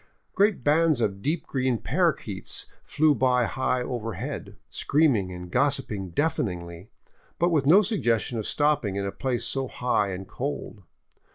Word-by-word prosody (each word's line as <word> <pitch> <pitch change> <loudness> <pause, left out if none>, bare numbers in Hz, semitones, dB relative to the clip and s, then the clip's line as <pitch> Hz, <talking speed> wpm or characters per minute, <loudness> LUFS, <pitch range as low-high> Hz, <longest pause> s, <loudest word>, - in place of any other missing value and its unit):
Great 200 - +2
bands 155 0 +3
of 100 -4 -1
deep 155 +6 -1
green 130 -2 0
parrakeets 140 - -1 0.2
flew 155 0 +3
by 125 -2 +2
high 130 0 -1
overhead, 115 -3 -5
screaming 135 -11 +1
and 90 0 -8
gossiping 130 -9 0
deafeningly, 90 - -2 0.5
but 175 - +2
with 145 -4 +2
no 190 +7 +7
suggestion 120 - 0
of 105 - -4
stopping 145 -9 +1
in 100 0 -2
a 100 - -2
place 130 +1 -2
so 135 -1 -1
high 125 -5 0
and 95 0 -6
cold. 135 -6 -5
125 Hz, 145 wpm, -26 LUFS, 100-150 Hz, 0.5 s, no